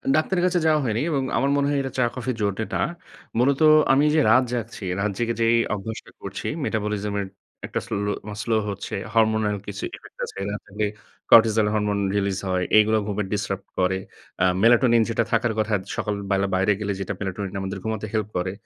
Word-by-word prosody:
ডাক্তারের 175 +3 +1
কাছে 180 -1 +2
যাওয়া 155 -1 +4
হয়নি 115 -2 0
এবং 140 -2 0
আমার 140 - +2
মনে 140 0 +2
হয় 145 -1 +1
এটা 135 -1 -4
চা-কফির 125 0 -1
জন্যে 100 +1 0
না। - - 0 0.6
মূলত 135 +4 +2 0.3
আমি 140 +2 +4
যে - - +5
রাত 125 +4 +6
জাগছি 115 -3 -4 0.2
রাত 100 0 0
জেগে 115 -1 0
যেই 115 +1 +4 0.2
অভ্যাসটা 110 +2 -6
করছি - - -5 0.2
মেটাবলিজম 105 -1 -2
এর 100 - -4 0.4
একটা - - -2
স্লো 105 -3 -2
মানে 105 -1 -7
স্লো 115 -1 +1
হচ্ছে। 100 0 -5 0.2
হরমোনাল 110 -2 +2
কিছু 100 0 -6
ইফেক্ট - - -16
আছে। - - -11
এগুলা 100 +1 -3
খাইলে 105 +1 -2 0.5
কর্টিসল 110 -2 +6
হরমোন 105 -1 0 0.2
রিলিজ 100 -2 0
হয়। 90 -1 +1
এইগুলো 110 +1 +5
ঘুমে 105 0 -1
ডিস্টার্ব 100 -1 -3
করে। 95 +1 +2 0.5
আ - - +5 0.2
মেলাটোনিন 120 0 +5
যেটা 115 0 +1
থাকার 115 0 +2
কথা 110 0 0 0.2
সকাল 105 - -2 0.2
বেলা 100 0 +2
বাইরে 95 +2 +2
গেলে 105 -1 -2 0.3
মেলাটোনিন 95 0 -4
আমাদের 95 +1 -4
ঘুমাতে 110 -1 -3
হেল্প 110 -2 -1
করে, 90 +1 -1
110 Hz, 185 wpm, -24 LUFS, 100-120 Hz, 0.6 s, রাত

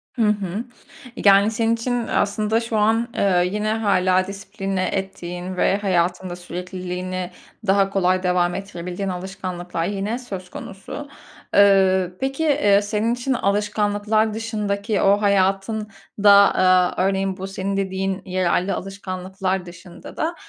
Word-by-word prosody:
Hı 240 - -2
hı. 205 0 -2 0.5
Yani, 200 -1 +5
senin 225 0 +1
için 235 0 -2
aslında 210 +2 +1
şu 230 -1 -2
an, 225 +2 +2
eee, 180 -2 +2
yine 210 +1 -1
hâlâ 185 -4 +2
disipline 195 -1 -3
ettiğin 180 -1 -4
ve 195 - +2
hayatında 180 -2 0
sürekliliğini 180 +1 -5 0.4
daha 195 0 +3
kolay 185 -1 +1
devam 180 -1 +1
ettirebildiğin 190 0 -5
alışkanlıklar 180 -2 -4
yine 205 +5 -2
söz 190 -8 -7
konusu. 195 +11 -8 0.5
Iıı, 190 -2 +4
peki, 270 +4 -2
eee, 270 -10 +4
senin 215 +2 0
için 245 +2 -1
alışkanlıklar 210 0 0
dışındaki 210 -2 -2
o 200 +1 +4
hayatında, 200 +1 +3
eee, 185 -1 +3
örneğin 195 0 0
bu 190 - -5
senin 195 0 -3
dediğin 190 0 -2
yararlı 185 0 0
alışkanlıklar 190 -1 -4
dışında 175 0 -12
da 330 +2 -1
195 Hz, 125 wpm, -22 LUFS, 185-210 Hz, 0.5 s, Yani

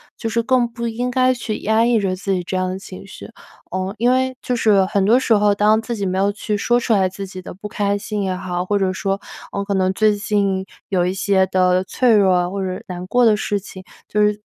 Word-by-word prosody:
就 225 - -4
是 230 +1 0
更 250 0 +2
不 235 0 -4
应 240 +2 -2
该 255 0 +3
去 235 -3 -4
压 220 +2 +2
抑 240 -2 +3
着 190 -2 -1
自 195 +1 -2
己 180 -1 -1
这 185 - -4
样 185 0 0
的 185 - -4
情 195 0 -11
绪。 205 - -11 0.4
呃， 185 +2 -3
因 240 +2 +3
为 260 0 +1
就 250 - -1
是 210 -4 +3
很 195 0 0
多 230 +5 +5
时 245 - +2
候， 205 -1 +3
当 215 +2 +3
自 235 +1 -4
己 200 -3 -3
没 185 0 -1
有 200 +1 +2
去 210 +1 -3
说 240 +4 +2
出 235 -1 0
来 190 -3 +3
自 195 +2 -7
己 185 -1 -9
的 180 - -9
不 200 +3 -8
开 205 -1 -1
心 210 0 -4
也 190 -2 -1
好， 180 -1 -3
或 205 +3 0
者 190 -1 0
说， 195 +1 -2 0.4
嗯， 200 - -2
可 200 - -2
能 185 -1 +2
最 215 +2 +2
近 200 -2 -1 0.2
有 185 -3 +1
一 180 +1 -1
些 195 -1 +2
的 185 0 +2
脆 240 +5 +2
弱 180 -3 +3
或 195 0 -3
者 185 -1 -4
难 180 0 -6
过 245 +4 +3
的 220 -2 +5
事 205 -1 -1
情， 190 -1 -11 0.2
就 210 - 0
是 210 0 +2
200 Hz, 275 characters per minute, -20 LUFS, 190-220 Hz, 0.4 s, 多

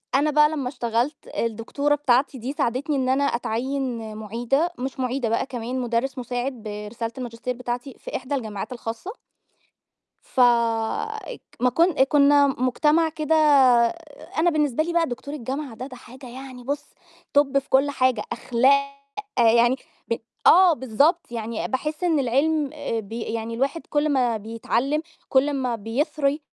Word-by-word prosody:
أنا 295 +2 +3
بقى 300 0 +5
لمّا 280 -5 -3
اشتغلت 245 +2 -1 0.2
الدكتورة 230 +6 0
بتاعتي 270 -1 +2
دي 250 +3 -4
ساعدتني 280 +3 -1
إن 260 -1 0
أنا 270 +2 +2
أتعيّن 240 -2 -2
مُعيدة 240 - 0
مش 265 +1 -4
مُعيدة 255 -2 -1
بقى 230 - 0
كمان 250 0 -4
مدرس 245 +3 -1
مساعد 245 +2 -3
برسالة 210 +2 -5
الماجستير 245 0 -4
بتاعتي 245 +1 -5
في - - -7
إحدى 260 +2 -2
الجماعات 220 -3 -5
الخاصة. 235 - -6 1.1
ف - - -3
اج 240 - +1 0.2
ما 250 +1 +3
كن 335 +8 +3
كُنّا 285 0 +5
مجتمع 295 +5 +2
كده 315 0 -1 1.0
أنا 340 +2 +4
بالنسبة 300 -3 +1
لي 340 - -3
بقى 340 -1 +2
دكتور 260 +4 -6
الجامعة 270 0 -5
ده، 250 +3 -6
ده 255 -2 -10
حاجة 255 +2 -13
يعني 255 0 -9
بُص 285 +3 -3 0.5
توب 285 -1 +4
في 275 - -7
كل 270 +2 +3
حاجة، 255 -5 +1
أخلاق 280 +3 +2 0.4
يعني 235 +2 +5 0.3
ب 230 - 0 0.3
آه 360 0 +8
بالضبط، 280 - +1
يعني 225 -1 -3
باحس 305 +5 -3
إن 330 -4 +3
العِلم 280 +3 +1
آآ، 290 -7 -3
ب 200 0 -13
يعني 230 0 -4
الواحد 275 +7 -2
كل 295 +1 +1
ما 250 -5 +2
بيتعلِّم 230 +7 -1 0.3
كل 265 +1 +3
أمّا 260 -4 -1
بيثري 280 +6 -1
260 Hz, 150 wpm, -24 LUFS, 235-290 Hz, 1.1 s, آه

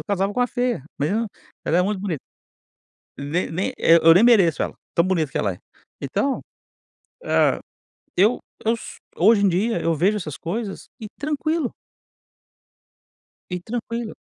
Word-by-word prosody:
casava 200 0 0
com 250 - 0
uma 245 - +4
feia, 245 - -1 0.2
mas 145 - +1
eu 210 - +1
não 230 - -1 0.4
ela 170 - +2
é 180 - +4
muito 200 +1 -1
bonita. 180 -8 -3 1.0
Nem 145 +6 -2
nem, 180 +4 -2
eh, 165 - +6
eu 165 0 +9
nem 185 +6 +5
mereço 200 -10 +5
ela, - - -4 0.2
tão 170 - +4
bonita 165 -6 0
que - - -2
ela 100 -3 0
é. 90 - -14 0.4
Então, 205 - -1 0.8
hã, - - +2 0.6
eu 210 +7 +4 0.3
eu 225 - +4
s 230 - -8 0.2
hoje 205 +4 +5
em - - +5
dia, 210 +7 0
eu 165 0 +1
vejo 190 +7 +2
essas 155 -8 -6
coisas, 200 +4 -5
e - - -5
tranquilo. 305 0 -1 1.8
E 180 -1 -3
tranquilo. 230 +3 -4
200 Hz, 165 wpm, -23 LUFS, 170-230 Hz, 1.8 s, eu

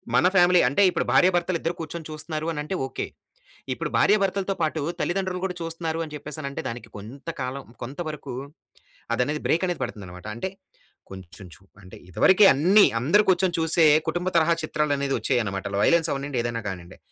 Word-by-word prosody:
మన 180 - +5
ఫ్యామిలీ 175 0 +6
అంటే 140 +10 +1
ఇప్పుడు 175 - -1
భార్య 180 - +5
భర్తలిద్దరు 170 -1 -1
కూర్చొని 165 0 -6
చూస్తున్నారు 155 +1 -4
అనంటే 150 +5 -4
ఓకే. - - -4 0.7
ఇప్పుడు - - -4
భార్య 210 - +5
భర్తలతో 195 0 -1
పాటు, 155 -1 0 0.2
తల్లిదండ్రులు 185 0 -2
కూడా 180 - -3
చూస్తున్నారు, 165 0 -3
అని 150 - -11
చెప్పేసనంటే 145 -1 -5
దానికి 115 -1 -8
కొంత 125 +10 -9
కాలం 130 +2 -4 0.2
కొంత 135 +7 -8
వరకు 145 -3 -7 0.8
అది - - +1
అనేది 150 +2 -3
బ్రేకనేది 175 +1 0
పడుతుందన్నమాట. 90 -3 -8
అంటే 155 +11 -3 0.6
కొంచెం 95 0 -11
చు 95 - -22 0.2
అంటే 90 - -13
ఇదివరకే 190 - +5
అన్ని 185 +9 +5
అందరు 170 - +4
కూర్చొని 180 -1 +2
చూసే 160 0 +3 0.2
కుటుంబ 175 +1 -1
తరహా 165 +1 +4
చిత్రాలు 150 -1 0
అనేవచ్చాయన్నమాట. 120 -8 -1 0.2
వయలెన్స్ 165 -2 +3
అవ్వనివ్వండి 140 -2 -2
ఏదైనా 115 -1 -3
కానివ్వండి. 90 -3 -7
155 Hz, 160 wpm, -25 LUFS, 125-175 Hz, 0.8 s, ఫ్యామిలీ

